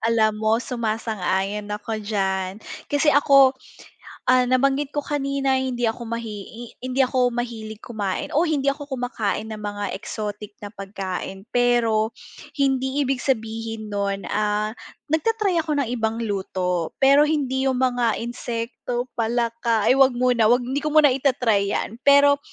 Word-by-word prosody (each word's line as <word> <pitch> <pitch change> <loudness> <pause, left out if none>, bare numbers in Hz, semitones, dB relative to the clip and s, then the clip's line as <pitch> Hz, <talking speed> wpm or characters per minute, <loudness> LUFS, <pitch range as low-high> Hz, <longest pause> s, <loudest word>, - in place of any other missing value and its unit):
Alam 225 -1 +3
mo, 220 +1 +3
sumasang-ayon 215 -4 -2
ako 210 +1 -4
diyan. 190 -3 -1 0.3
Kasi 290 +1 +3
ako, 275 -2 +6 0.8
ah, 255 0 +5
nabanggit 270 +2 +2
ko - - +2
kanina, 275 -2 0
hindi 250 -2 -2
ako 225 +1 -3
mahi 230 -2 -4
i 230 - -10 0.2
hindi 255 +1 -1
ako 250 -1 +2
mahilig 225 -3 -5
kumain 205 -6 -3
o 315 +4 +4
hindi 280 -3 +1
ako 290 0 -9
kumakain 225 -3 -2
ng 215 - -7
mga 205 -1 -4
exotic 210 +1 -6
na 205 - -6
pagkain, 195 -1 -6
pero 235 -2 +2 0.4
hindi 270 0 +1
ibig 265 -1 -1
sabihin 225 -3 -2
no'n, 200 -1 -2
ah 210 0 0 0.4
nagta-try 390 +3 +1
ako 310 -2 -2
ng 250 - -4
ibang 225 +1 -1
luto, 185 -5 -2
pero 280 +2 +7
hindi 270 -3 0
yung 260 - +1
mga 245 -3 +1
insekto, 240 +1 -4
palaka, 230 -1 0
ay - - +6
huwag 265 -2 +5
muna, 245 -2 +3
huwag 245 +1 +4
hindi 265 +3 -2
ko 305 - -1
muna 305 -2 +7
ita-try 250 -7 +1
yan. 225 - -3
Pero 285 0 +6
235 Hz, 145 wpm, -23 LUFS, 215-265 Hz, 0.8 s, pero